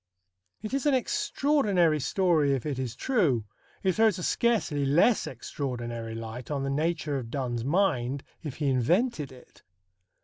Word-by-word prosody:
It 215 - -5
is 275 +2 0
an 285 - +4
extraordinary 260 - +2
story, 155 -2 +2
if 130 - -5
it 140 -4 -2
is 125 -3 -3
true. 155 - +1 0.4
It 190 - +3
throws 220 -2 +3
a 180 - -5
scarcely 210 -13 +1
less 165 - +3
extraordinary 120 -3 -5
light 115 +2 -7
on 140 -2 -2
the 135 - -1
nature 155 -1 -1
of 115 -3 -7
Donne's 120 -3 -2
mind, 140 -5 +1 0.2
if 150 -5 -6
he 150 - -3
invented 150 - +1
it. 125 -1 -17
145 Hz, 150 wpm, -28 LUFS, 130-195 Hz, 0.4 s, an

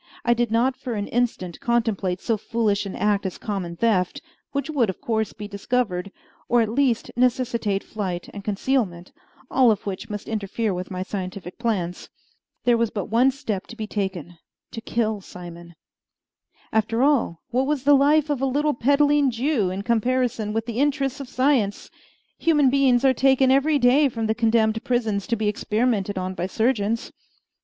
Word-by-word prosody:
I 240 - +5
did 240 0 0
not 240 +4 +2
for 245 -3 -5
an 205 -1 -2
instant 225 -8 -1
contemplate 220 -6 0
so 230 - +1
foolish 215 -2 -1
an 195 - -6
act 205 -1 +1
as 190 -2 -3
a - - -29
common 190 -6 -4
theft, 210 +3 +1 0.3
which 280 -1 -2
would 275 -9 +1
of 190 - -5
course 220 -2 -1
be 210 -1 -8
discovered, 200 -2 -2 0.4
or 240 - +4
at 225 -2 +2
least 245 -1 +1
necessitate 235 -5 +1
flight 185 -5 -4
and 200 - -8
concealment, 200 -4 -1 0.4
all 255 -2 +5
of 210 -2 0
which 195 -2 -5
must 210 -1 -6
interfere 215 0 -2
with 180 0 -5
my 185 -1 -3
scientific 185 -1 -6
plans. 195 -7 -2 0.5
There 240 -1 +4
was 230 -1 +1
but 205 -1 -5
one 245 +4 +5
step 245 -8 -4
to - - -10
be 220 -2 -4
taken 185 -5 -4 0.3
to 225 - -6
kill 220 -3 -1
Simon. 175 -2 -11 1.0
After 225 +2 +1
all, 270 - +1
what 260 +2 +1
was 290 -3 -1
the 290 +1 +5
life 295 +2 +4
of 275 -3 -1
a 270 - +2
little 295 +3 +1
peddling 285 +3 +3
Jew 240 -4 0
in 190 +2 -4
comparison 235 -1 0
with 225 +1 -2
the 235 0 -4
interests 285 -1 0
of 275 -3 -7
science? 255 -7 +1 0.5
Human 295 -5 +3
beings 270 -2 +3
are 265 - +5
taken 265 +1 +4
every 285 +3 +3
day 275 +3 +4
from 230 -2 -3
the 220 - +1
condemned 225 -1 +2
prisons 220 -5 -1
to 230 - +1
be 215 -1 -1
experimented 210 -1 0
on 185 0 -2
by 180 0 -3
surgeons. 225 0 0
225 Hz, 180 wpm, -23 LUFS, 200-255 Hz, 1.0 s, I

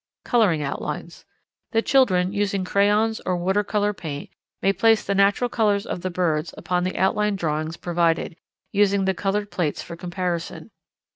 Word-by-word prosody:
Colouring 200 -11 +2
Outlines. 140 - -5 0.5
The 225 0 +2
children, 195 -9 +3
using 200 -2 0
crayons 210 +3 +2
or 180 - 0
water 190 +4 +1
colour 205 0 0
paint, 150 -6 -7 0.3
may 195 - +2
place 225 +1 +3
the 200 - 0
natural 200 +5 +3
colours 210 -4 +1
of 175 - -4
the 185 - -2
birds 170 -3 -1
upon 180 0 -1
the 185 - -3
outline 210 +2 +1
drawings 160 -2 -2
provided, 170 -1 0 0.4
using 200 -1 +2
the 190 - +2
coloured 205 +2 -2
plates 160 -5 -2
for 170 - -8
comparison. 175 -1 -4
190 Hz, 155 wpm, -23 LUFS, 175-205 Hz, 0.5 s, children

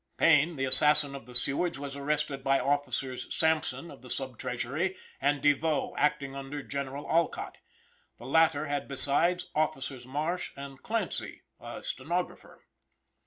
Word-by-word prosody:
Payne, 160 +1 +3
the 135 -1 -2
assassin 145 +2 +7
of 135 -4 -10
the 125 - -13
Sewards, 140 +6 +3
was 140 0 -8
arrested 145 -1 -3
by 135 0 +1
Officers, 135 -2 -3
Sampson, 160 +1 -1
of 140 - -15
the 125 - -14
sub 130 -3 -6
treasury, 155 +10 -4 0.2
and 145 0 0
Devoe, 145 +1 0
acting 145 -2 -1
under 140 +1 -7
General 140 +1 -6
Alcott. 170 +1 -2 0.6
The - - -13
latter 160 -2 +2
had 145 -1 -4
besides, 170 +6 +6
Officers 135 -5 -3
Marsh 155 +7 -4
and 140 -1 -10
Clancy 225 - -4 0.2
(a - - -10
stenographer). - - -6
145 Hz, 140 wpm, -28 LUFS, 135-155 Hz, 0.6 s, assassin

